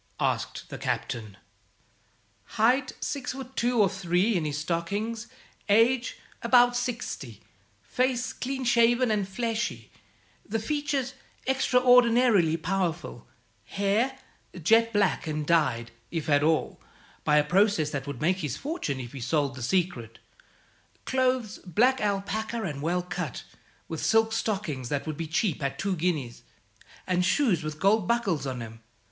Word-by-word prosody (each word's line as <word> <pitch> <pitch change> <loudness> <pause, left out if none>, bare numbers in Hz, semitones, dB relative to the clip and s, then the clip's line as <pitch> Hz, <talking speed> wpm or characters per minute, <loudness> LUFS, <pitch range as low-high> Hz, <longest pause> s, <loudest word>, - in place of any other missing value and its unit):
asked - - -1
the - - -7
Captain. 110 -4 -3 1.2
"Height, 250 +5 +3
six 275 -2 -3
foot 265 0 -9
two 240 0 +1
or 205 - +6
three 190 +3 +1
in 165 -3 0
his 145 -1 -2
stockings; 200 +9 -2 0.4
age, 235 +4 +3 0.2
about 245 -1 +5
sixty; 240 - -4 0.4
face, 255 - 0
clean 265 +1 -4
shaven 240 0 +3
and 205 -2 0
fleshy; 230 +3 -3 0.5
the 225 - -2
features 280 +2 -2 0.3
extraordinarily 245 -8 +4
powerful; 175 0 -3 0.4
hair, 210 +7 0 0.5
jet 230 +6 +4
black, 205 -5 +1
and 150 -1 -2
dyed 130 -8 +1 0.2
(if 165 -3 -4
at 145 0 +5
all) 155 +1 +1 0.4
by 150 -1 +3
a 150 - +5
process 175 -1 +2
that 140 -1 -4
would 140 -4 -5
make 180 +4 +2
his 150 -7 -3
fortune 280 - -3
if 120 0 -7
he 135 - -7
sold 145 +1 0
the 130 - -9
secret; 120 - -1 0.9
clothes, 255 -4 0
black 240 +9 +2
alpaca 210 +3 -2
and 145 -7 -4
well 175 +3 0
cut, 175 -7 -5 0.4
with 160 - -5
silk 225 0 +3
stockings 190 - -2
that 145 -1 -2
would 155 -1 -4
be 165 +1 -4
cheap 165 +1 0
at 140 0 -2
two 195 +3 -1
guineas, 155 -9 -2 0.6
and 180 -1 +1
shoes 190 - +2
with 155 -1 -5
gold 200 0 +3
buckles 200 -12 0
on 125 -3 -4
'em. 115 0 -11
195 Hz, 140 wpm, -27 LUFS, 155-235 Hz, 1.2 s, or